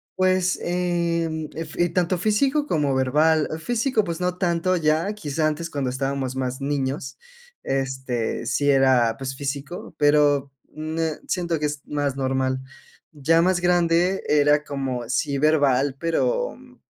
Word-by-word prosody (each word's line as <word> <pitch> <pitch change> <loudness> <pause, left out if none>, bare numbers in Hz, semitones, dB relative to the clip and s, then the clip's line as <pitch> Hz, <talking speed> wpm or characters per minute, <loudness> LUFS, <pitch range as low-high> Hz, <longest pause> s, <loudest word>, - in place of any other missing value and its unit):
pues, 185 -1 +2
em, 170 -3 -1
ef 165 0 -6
y 175 0 +3
tanto 180 +1 0
físico 275 +9 +1
como 145 - +1
verbal. 150 +4 +2
Físico, 235 - 0
pues 170 -2 -4
no 180 0 -1
tanto 180 0 +1
ya, 160 +5 +1
quizá 155 -4 -1
antes 165 +2 -3
cuando 140 -3 -2
estábamos 135 0 -2
más 130 0 -3
niños, 135 -1 -2 0.5
este, 130 -3 -2
sí 145 0 +1
era, 130 -4 +4
pues 135 0 -5
físico, 140 +4 -5
pero, 145 -2 +3 0.2
ne 155 0 -3
siento 170 -3 -1
que 150 - -1
es 145 -1 -5
más 145 -2 -1
normal. 130 0 0 0.5
Ya 165 +2 +2
más 180 0 +2
grande 175 +1 +2
era 150 0 +4
como 130 -5 -4
sí 140 +2 0
verbal, 140 -3 +3
pero, - - 0
mm, 255 -1 -18
150 Hz, 140 wpm, -23 LUFS, 135-175 Hz, 0.5 s, era